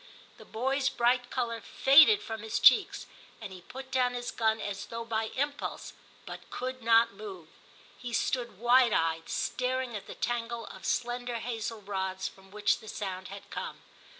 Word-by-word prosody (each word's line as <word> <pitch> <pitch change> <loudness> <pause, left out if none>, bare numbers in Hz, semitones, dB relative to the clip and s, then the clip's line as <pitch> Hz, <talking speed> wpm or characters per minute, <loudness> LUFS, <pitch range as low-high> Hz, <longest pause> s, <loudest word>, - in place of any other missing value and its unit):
The - - -12
boy's 265 +4 0
bright 245 0 +1
colour 230 -3 -2
faded 310 +10 +6
from 225 -1 -5
his 220 0 -2
cheeks, - - +5 0.3
and 190 - -8
he 185 - -10
put 265 +7 -10
down 250 -1 +1
his 245 0 -4
gun 220 -1 +1
as 200 -1 -5
though 230 0 -6
by 225 -1 -1
impulse, 285 +2 -3 0.3
but - - -9
could 255 0 -5
not 230 0 +4
move; 405 -3 -9 0.5
he 245 -1 -6
stood 235 -3 -1
wide 240 +1 +5
eyed, 165 0 0
staring 255 -1 -1
at 205 - -7
the - - -8
tangle 235 -1 -2
of - - -8
slender 245 0 -1
hazel 230 -1 -4
rods 190 -1 -3
from 195 0 -14
which 210 +1 +1
the 220 - -14
sound 190 -3 -5
had 200 0 -10
come. - - -6
235 Hz, 170 wpm, -30 LUFS, 210-250 Hz, 0.5 s, faded